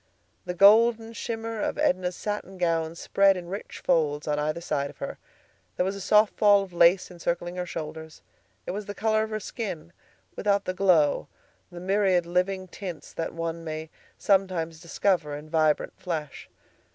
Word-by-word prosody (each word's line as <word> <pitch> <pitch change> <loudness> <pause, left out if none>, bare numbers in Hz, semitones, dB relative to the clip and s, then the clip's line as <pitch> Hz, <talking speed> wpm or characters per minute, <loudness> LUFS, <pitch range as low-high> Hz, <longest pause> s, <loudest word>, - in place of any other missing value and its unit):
The 180 0 -4
golden 225 +4 +5
shimmer 225 -1 -4
of - - -2
Edna's 180 0 +1
satin 205 -2 -5
gown 165 -2 0
spread 195 +2 +3
in 175 -1 -8
rich 200 +3 -7
folds 155 -4 +1
on 150 0 0
either 155 +2 -1
side 140 -4 -2
of - - -14
her. - - -6 0.6
There 180 - +2
was 195 +1 -2
a 200 - -7
soft 210 +2 +4
fall 205 -1 +5
of 190 -2 -11
lace 175 +2 +4
encircling 175 0 -3
her 180 0 -3
shoulders. 160 -1 -7 0.4
It - - -3
was 205 +2 -5
the 205 - -6
color 220 0 +1
of 220 - -2
her 215 0 -3
skin, 175 -7 -6 0.4
without 200 -1 +1
the 185 - -2
glow, 175 -6 +3 0.4
the 175 - -8
myriad 190 -1 +2
living 185 +2 -1
tints 180 -2 -8
that 165 0 -4
one 165 0 -4
may 155 0 -6 0.3
sometimes 185 -5 +1
discover 170 -3 0
in 150 +1 -10
vibrant 155 -2 +2
flesh. 155 -5 -5
180 Hz, 170 wpm, -26 LUFS, 165-200 Hz, 0.6 s, golden